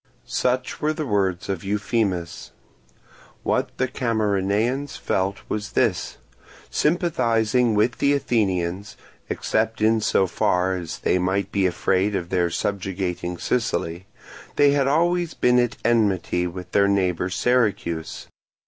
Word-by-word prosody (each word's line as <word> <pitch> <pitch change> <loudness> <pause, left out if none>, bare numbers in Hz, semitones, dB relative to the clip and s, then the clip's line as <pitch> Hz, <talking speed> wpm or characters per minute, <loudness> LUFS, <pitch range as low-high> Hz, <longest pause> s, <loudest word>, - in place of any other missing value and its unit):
Such 125 +1 -1
were 155 +1 +1
the 155 -1 -4
words 95 -6 0
of 95 -4 -3
Euphemus. 100 -4 -2 0.9
What - - 0
the 130 - +1
Camarinaeans 115 +2 0
felt 95 +1 -1
was 105 0 -4
this. 110 -9 0 0.5
Sympathizing 125 -8 +1
with 110 +3 +1
the 140 0 +3
Athenians, 100 -7 -1 0.3
except 110 +1 -1
in 110 +1 +3
so 95 - +2
far 90 +1 +1
as 85 -3 -5
they 90 - +1
might 95 +2 -1
be 100 -2 +2
afraid 95 +3 0
of 85 -2 -3
their 90 -2 +1
subjugating 90 -2 -3
Sicily, 95 -6 -2 0.5
they 145 -1 +5
had 140 -1 +2
always 170 +3 +1
been 125 0 +3
at 120 -1 0
enmity 100 -6 +1
with 90 0 -8
their 100 -1 +4
neighbour 95 -3 +1
Syracuse. 100 -8 0
100 Hz, 125 wpm, -23 LUFS, 90-120 Hz, 0.9 s, they